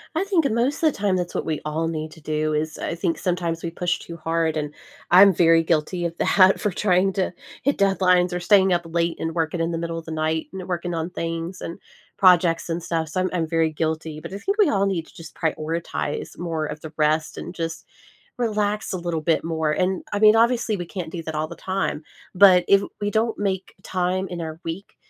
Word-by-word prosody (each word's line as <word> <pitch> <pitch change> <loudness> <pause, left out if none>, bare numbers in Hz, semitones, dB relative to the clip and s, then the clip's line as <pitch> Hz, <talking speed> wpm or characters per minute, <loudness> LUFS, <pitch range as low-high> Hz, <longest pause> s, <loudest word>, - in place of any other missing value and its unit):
I - - +1
think 350 -8 +2
most 240 +6 0
of 315 -2 +4
the - - -12
time 200 -2 +1
that's 175 -1 -3
what - - -2
we 155 -2 -2
all 160 +2 -1
need 155 -1 -3
to 160 - -15
do 155 0 -1
is 155 0 -2
uh, - - -3
I 170 - -2
think 170 -1 -1
sometimes 170 -2 -2
we 170 - -2
push 170 +1 -1
too 170 - -9
hard, 165 0 0
and 150 -1 -3 0.4
I'm 190 +2 +8
very 165 -1 +5
guilty 165 +2 0
of 170 0 -4
that 190 -1 +4
for 210 - 0
trying 190 0 +2
to 190 -1 0 0.3
hit 280 +1 +1
deadlines 180 -2 +3
or 180 - -1
staying 190 0 +4
up 175 - +1
late, 170 0 -1
and 165 +1 -3
working 165 +1 -1
in 165 +1 0
the 165 - -2
middle 165 0 -3
of 165 - -12
the 160 - -7
night, 160 0 -1
and 190 -1 -7
working 175 -1 -2
on 165 +2 -3
things 165 +2 -4
and 170 - -6 0.4
projects 175 -3 +4
and 165 +1 -2
stuff, 165 -1 -2
so 185 +3 -1
I'm 185 - 0
I'm 165 -3 0
very 165 -1 +2
guilty, 160 0 -3
but 170 - -9
I 200 - -5
think 395 - -1
we 410 -7 +5
all 200 -4 +2
need 175 -4 -1
to - - -19
just 165 -1 -11
prioritize 160 -1 -3
more 165 -3 -2
of 150 0 -6
the 160 - -8
rest 155 +1 +1
and - - -6
just 165 -2 -5 0.5
relax 210 -3 -1
a 185 - -2
little 170 -2 -2
bit 160 0 +2
more, 160 -2 0
and, 185 +3 0
I 205 - 0
mean, 215 +1 +6
obviously, 230 -2 +2
we 175 -2 -5
can't 170 -4 -6
do 165 -1 -5
that 160 -1 -6
all 155 +1 -1
the - - -9
time, 190 -5 -2 0.3
but 185 -2 +7
if 200 0 +6 0.2
we 205 0 -1
don't 225 +2 0
make 190 -2 -2
time 185 +1 -1
in 175 -1 -6
our 160 0 -6
week 165 +5 -6
170 Hz, 235 wpm, -23 LUFS, 160-190 Hz, 0.5 s, I'm